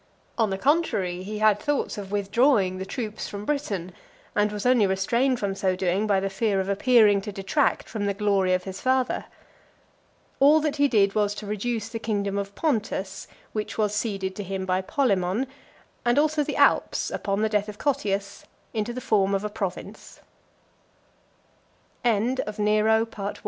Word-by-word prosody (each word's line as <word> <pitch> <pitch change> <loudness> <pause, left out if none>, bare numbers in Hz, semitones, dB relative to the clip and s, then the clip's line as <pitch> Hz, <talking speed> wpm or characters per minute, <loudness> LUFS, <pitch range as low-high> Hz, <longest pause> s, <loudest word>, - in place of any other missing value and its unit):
On 225 -3 +1
the 190 - -2
contrary, 210 - +1
he 210 +3 -5
had 215 -1 +4
thoughts 290 +3 -1
of 200 -2 -7
withdrawing 205 -1 +2
the 190 - -5
troops 220 -2 -4
from 205 0 -6
Britain, 205 -12 -2 0.4
and 210 0 +2
was 210 +1 -5
only 245 -5 +4
restrained 235 +7 +1
from 200 -1 -1
so 190 -1 0
doing 185 +3 0
by 200 -2 +3
the 195 - -1
fear 195 0 0
of 190 - -2
appearing 205 0 +4
to 210 +1 -6
detract 200 +9 0
from 205 -3 -3
the 200 - -1
glory 195 -3 +2
of 180 - -3
his 190 0 -7
father. 260 0 +1 1.1
All 295 +3 +6
(349) - - -4
that 300 -1 -1
he 285 0 +4
did 200 -6 +3
was 205 -1 +1
to 210 - -7
reduce 215 +2 -3
the 225 - -5
kingdom 200 -3 -1
of 200 0 -6
Pontus, 210 -9 -2 0.3
which 215 -1 -4
was 210 -2 +1
ceded 195 -3 -2
to 205 - -3
him 190 0 -4
by 185 0 +1
Polemon, 195 -1 0 0.6
and 240 +1 +2
also 300 0 +3
the - - -4
Alps, - - +2
upon 200 +1 -1
the - - +3
death 210 -1 0
of 210 - -8
Cot 280 +2 0
205 Hz, 155 wpm, -25 LUFS, 195-240 Hz, 1.1 s, All